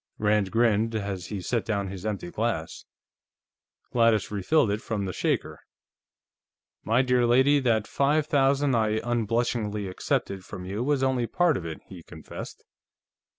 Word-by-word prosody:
Rand 105 -2 +2
grinned 115 0 +2
as 100 -4 -3
he 100 -3 -5
set 115 +2 -1
down 100 -3 -2
his 95 +2 -6
empty 100 -5 -4
glass. 105 -8 -3 1.1
Gladys 115 -4 +2
refilled 105 - +2
it 105 +2 -2
from 105 -3 -3
the 95 - -4
shaker. - - -2 1.2
"My 115 +5 +2
dear 125 -1 +2
lady, 130 +4 +4
that 115 -5 +1
five 145 +2 +1
thousand 140 -1 +2
I 110 -1 +1
unblushingly 115 -3 -1
accepted 95 +1 -2
from 90 -1 -8
you 100 +5 -3
was 140 0 +1
only 130 -3 +1
part 175 0 +2
of 85 -6 -4
it," 80 - -7
he 90 -3 -11
confessed. 80 -1 -10
110 Hz, 150 wpm, -26 LUFS, 100-125 Hz, 1.2 s, lady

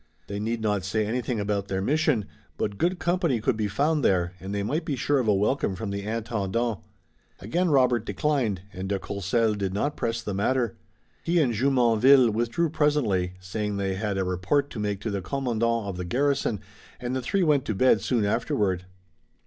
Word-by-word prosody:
They 100 +3 -5
need 115 +2 -2
not 105 -3 0
say 105 +3 0
anything 120 +1 -2
about 100 -1 -1
their 95 -1 -2
mission, 135 0 +1 0.3
but 100 -1 -3
good 180 +2 +1
company 175 -8 +1
could 110 - +1
be 110 -1 -1
found 145 +8 +1
there, 90 -1 +2
and 95 +1 -7
they 100 0 -1
might 150 +11 -1
be 145 - -2
sure 140 +3 +1
of 120 - -1
a 105 - +5
welcome 105 0 +1
from 100 +1 -4
the 100 0 -3
Intendant. 110 0 -2 0.6
Again 170 - 0
Robert 125 -5 +3
declined, 120 - -1
and 95 +1 -5
de 100 - +1
Courcelles 100 +3 0
did 95 -1 -2
not 145 +8 -1
press 115 0 -2
the 105 - -3
matter. 120 +3 0 0.5
He 170 +1 +1
and 130 -7 +2
Jumonville 125 0 +5
withdrew 120 +9 0
presently, 120 - +1
saying 105 +2 -3
they 95 -1 -1
had 100 0 -2
a 95 - +1
report 95 +11 0
to 115 - -6
make 105 -2 -2
to 110 - -3
the 100 -1 -2
commandant 115 +1 -1
of 95 -2 -4
the 90 - -4
garrison, 130 0 0 0.4
and 125 +1 -3
the 130 - -1
three 190 +10 0
went 150 -5 +3
to 110 - -2
bed 130 +6 +4
soon 115 -5 +1
afterward. 100 -4 0
110 Hz, 195 wpm, -26 LUFS, 100-130 Hz, 0.6 s, a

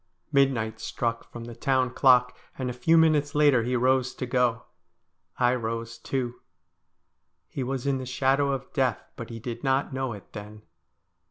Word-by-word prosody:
Midnight 125 -6 +2
struck 115 -1 -3
from 120 - -8
the 120 0 -8
town 130 0 +1
clock, 125 -2 +4 0.2
and 130 -2 -2
a - - -6
few 145 +7 +3
minutes 155 -3 +3
later 145 -5 +5
he 125 +2 -1
rose 130 +1 +2
to 130 - -4
go. 125 -2 +1 0.7
I 125 -1 +3
rose 115 -1 -4
too. 125 -2 -3 1.1
He 140 - -5
was 130 0 -3
in 140 -1 +1
the 130 - -6
shadow 135 +2 +2
of 135 -1 -5
death, 130 -6 0
but 115 - -8
he 115 - -6
did 120 +2 -6
not 135 0 +1
know 130 -2 -2
it 100 - -13
then. 105 0 -9
125 Hz, 170 wpm, -26 LUFS, 120-135 Hz, 1.1 s, later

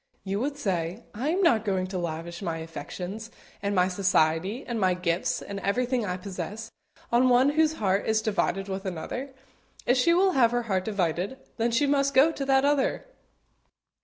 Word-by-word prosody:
you 195 +1 -2
would 280 +4 -2
say; 185 - -2
"I 255 +8 -2
am 370 +4 +1
not 230 - +4
going 190 -3 0
to 185 0 -4
lavish 170 0 -5
my 165 -4 -2
affections, 180 +6 -7 0.3
and 200 0 -1
my 180 0 +4
society, 185 - +1
and 235 -2 -3
my 185 -2 +2
gifts, 175 -1 -1
and 200 0 -6
everything 245 +3 0
I 180 0 -2
possess, 195 +3 -6 0.4
on 245 +2 +4
one 250 +3 +5
whose 315 +1 +3
heart 200 -7 0
is 220 0 +3
divided 195 -2 0
with 195 0 -4
another. 190 +10 -5 0.6
If 245 - +3
she 335 +7 +4
will 380 +1 +4
have 250 -8 +4
her 240 0 +1
heart 190 -5 -1
divided, 190 +2 -1 0.2
then 230 0 +1
she 235 +5 +2
must 280 -1 +1
go 280 +5 +6
to 280 -3 -4
that 270 0 +3
other." 285 -2 +1
210 Hz, 185 wpm, -27 LUFS, 185-260 Hz, 0.6 s, go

